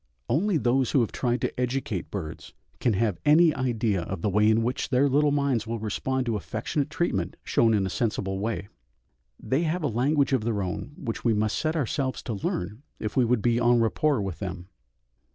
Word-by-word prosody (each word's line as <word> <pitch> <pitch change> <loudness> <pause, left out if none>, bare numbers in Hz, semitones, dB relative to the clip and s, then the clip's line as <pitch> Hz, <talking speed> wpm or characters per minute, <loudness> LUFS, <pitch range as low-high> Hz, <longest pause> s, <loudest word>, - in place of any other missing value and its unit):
Only 175 - +2
those 130 -1 +2
who 135 - +3
have 115 - -1
tried 125 -1 -1
to - - -2
educate 125 -7 -2
birds 85 -7 -7 0.2
can 120 - +2
have 105 -2 0
any 155 +2 +6
idea 115 -7 0
of 90 0 -5
the 105 - +1
way 105 +2 +4
in 110 +1 +3
which 125 +3 -2
their 135 +2 +3
little 145 +2 +3
minds 140 -6 0
will 115 +1 -2
respond 125 +4 -2
to 115 -2 0
affectionate 145 +7 -2
treatment 155 - -1
shown 115 -1 +3
in 100 -2 +1
a - - -2
sensible 95 -4 -1
way. 105 0 -3 0.7
They 135 +4 0
have 170 +1 -1
a - - +2
language 135 +4 +1
of 130 -5 +2
their 110 -3 -1
own 100 +9 -5
which 125 -11 -5
we 115 -2 +3
must 110 +1 0
set 155 +1 -1
ourselves 135 -2 -1
to 115 - -3
learn 100 +2 -3 0.2
if 105 - -4
we 130 - +4
would 120 -2 +1
be 120 0 +2
en 120 0 +4
rapport 115 +2 +1
with 90 -5 -5
them. 90 -1 -6
120 Hz, 205 wpm, -26 LUFS, 105-135 Hz, 0.7 s, any